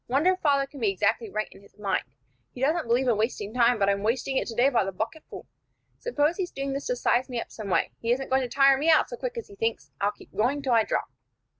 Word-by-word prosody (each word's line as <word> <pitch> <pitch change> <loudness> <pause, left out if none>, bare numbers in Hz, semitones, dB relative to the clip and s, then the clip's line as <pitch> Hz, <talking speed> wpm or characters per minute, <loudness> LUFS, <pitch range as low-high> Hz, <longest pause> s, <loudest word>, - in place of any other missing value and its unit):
Wonder 285 +9 +3
if 370 - -7
father 280 -4 +2
can 275 +1 -12
be 220 -4 +2
exactly 210 +3 0
right 215 +2 -2
in - - -15
his 200 - -21
mind. 200 -3 0 0.5
He - - -9
doesn't 310 +3 +1
believe 245 +3 +2
in 235 -4 +3
wasting 215 -1 -2
time, 245 -1 +4
but 200 -2 +2
I'm 200 0 +1
wasting 245 +5 -1
it - - 0
today 240 +3 +2
by 245 -6 +2
the 195 - -3
bucketful. 225 +11 -6 0.5
Suppose 335 -9 0
he's 370 -3 -2
doing 275 -2 -4
this 275 - -4
to - - 0
size 255 - +1
me 245 -2 -2
up - - -7
some 215 -3 -7
way; - - +1
he 230 - -1
isn't 265 +2 -1
going 265 0 +3
to 250 - -3
tire 275 +1 +5
me 310 +3 +1
out 315 - +5
so - - -3
quick 485 0 -5
as 465 - -5
he - - -14
thinks. 210 -10 -2
I'll 200 - +3
keep 210 - -18
going 270 +6 +1
till 260 -3 +1
I 225 -2 +4
drop." - - -2
245 Hz, 270 wpm, -26 LUFS, 215-280 Hz, 0.5 s, tire